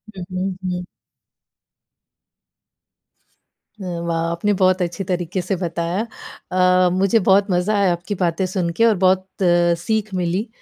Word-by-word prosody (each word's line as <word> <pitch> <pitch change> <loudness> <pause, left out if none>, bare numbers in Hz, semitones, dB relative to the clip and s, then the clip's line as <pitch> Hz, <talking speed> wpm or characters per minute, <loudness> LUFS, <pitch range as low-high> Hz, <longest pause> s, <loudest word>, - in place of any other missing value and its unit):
हुँ, 185 - -6
हुँ, 185 0 -2 0.2
हुँ। 180 0 -4 3.0
हुँ, 175 -2 -4
वाह! 165 -1 0
आपने 205 +5 0
बहुत 185 0 +3
अच्छी 175 +2 -2
तरीक़े 180 0 -2
से 185 +2 -2
बताया। 170 +2 -2 0.5
अ, 180 0 +4
मुझे 195 +4 +3
बहुत 195 +1 +3
मज़ा 185 +4 +1
आया 195 -2 +3
आपकी 180 +4 -5
बातें 170 +2 +1
सुन 185 -2 -2
के 230 - +4
और 225 -2 +4
बहुत 185 0 +3 0.5
सीख 215 +2 -2
मिली, 180 +5 -1
185 Hz, 135 wpm, -20 LUFS, 175-195 Hz, 3.0 s, अ